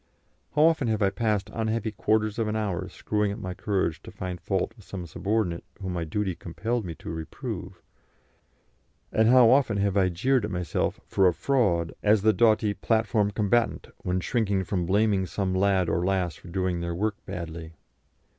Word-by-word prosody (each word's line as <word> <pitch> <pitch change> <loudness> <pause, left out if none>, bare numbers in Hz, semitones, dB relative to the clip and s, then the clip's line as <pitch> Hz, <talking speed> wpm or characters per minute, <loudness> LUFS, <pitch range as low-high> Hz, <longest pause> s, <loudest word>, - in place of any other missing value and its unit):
How 150 - +5
often 160 -5 +3
have 110 -2 +1
I 95 - +3
passed 105 -1 -1
unhappy 110 0 -1
quarters 110 +1 0
of 115 - +1
an 105 - -1
hour 100 -6 -2
screwing 105 -1 -1
up 100 - -5
my 95 -4 -5
courage 95 -4 -1
to - - -11
find 90 -2 -6
fault - - -1
with - - -16
some 90 -3 -7
subordinate 95 +1 -1 0.2
whom 95 -2 -4
my 85 -2 -2
duty 95 +4 -1
compelled 105 +7 -3
me 85 -2 -5
to - - -8
reprove, 80 -1 -6 1.3
and 110 0 +3
how 125 -1 +7
often 130 -6 +3
have 100 -1 +1
I 95 -2 +3
jeered 125 +8 +1
at 105 - -2
myself 90 -3 -2
for 95 - +3
a 90 - +3
fraud 90 - +1
as 105 -1 +3
the 110 0 +5
doughty 110 -2 +3
platform 110 -1 +1
combatant, 105 +3 0
when 90 +1 -1
shrinking 100 -4 0
from 90 -1 -2
blaming 100 -1 +2
some 95 +2 -2
lad 95 -1 +2
or 85 +1 0
lass 90 -2 0
for - - -15
doing 90 0 -1
their 85 0 -3
work 105 +3 -2
badly! 80 -1 -6
100 Hz, 185 wpm, -26 LUFS, 90-110 Hz, 1.3 s, how